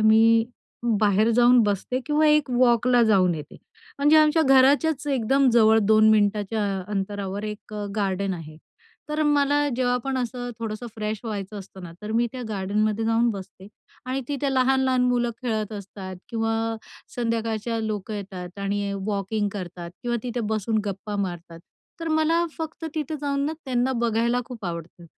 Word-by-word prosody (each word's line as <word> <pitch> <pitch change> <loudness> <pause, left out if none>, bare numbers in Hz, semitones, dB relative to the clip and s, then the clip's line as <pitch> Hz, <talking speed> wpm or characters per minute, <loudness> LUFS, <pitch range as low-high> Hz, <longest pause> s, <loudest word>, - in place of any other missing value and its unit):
मी 225 +1 +5 0.6
बाहेर 210 +1 +3
जाऊन 245 +2 +5
बसते 210 +4 -1
किंवा 300 +1 +3
एक 300 -2 +3
वॉकला 245 0 +4
जाऊन 185 -4 +4
येते." 150 -2 -8 0.4
म्हणजे 295 +2 +5
आमच्या 310 +1 +5
घराच्याच 280 +2 +4
एकदम 270 0 +2
जवळ 220 -1 +5
2 215 +1 +5
मिनिटांच्या 210 0 +1 0.3
अंतरावर 200 0 -3
एक 210 0 -7 0.2
गार्डन 195 -1 -1
आहे. 155 -2 -9 0.5
तर 300 +1 0
मला 290 0 +2
जेव्हा 250 -1 +1
पण 270 -1 -1
असं 245 0 -3
थोडंसं 225 +1 -5
फ्रेश 215 0 -3
व्हायचं 205 -2 -5
असतं 190 -1 -11
ना, 170 -2 -8
तर 210 +1 -4
मी 235 +1 +2
त्या 255 -1 -6
गार्डनमध्ये 210 +2 0
जाऊन 225 +1 +2
बसते 195 -2 -9 0.4
आणि 260 +1 -2
तिथे 280 -1 -1
लहान-लहान 260 0 +3
मुलं 245 -1 +1
खेळत 220 -3 -2
असतात 195 -2 -8
किंवा 225 -1 -1 0.6
संध्याकाळचे 230 -1 -2
लोकं 215 0 -4
येतात 190 -2 -7
आणि 200 0 -2
वॉकिंग 205 0 -1
करतात 175 -3 -7
किंवा 240 -1 -1
तिथे 245 -1 -3
बसून 220 +1 0
गप्पा 205 +1 -4
मारतात. 175 -4 -4 0.4
तर 330 - -3
मला 315 +2 +2
फक्त 320 0 -6
तिथे 310 0 -3
जाऊन 280 -1 -1
ना, 310 - -1
त्यांना 255 -1 0
बघायला 235 0 +1
खूप 235 -4 -9
आवडतं, 170 0 -6
225 Hz, 155 wpm, -24 LUFS, 205-255 Hz, 0.6 s, मी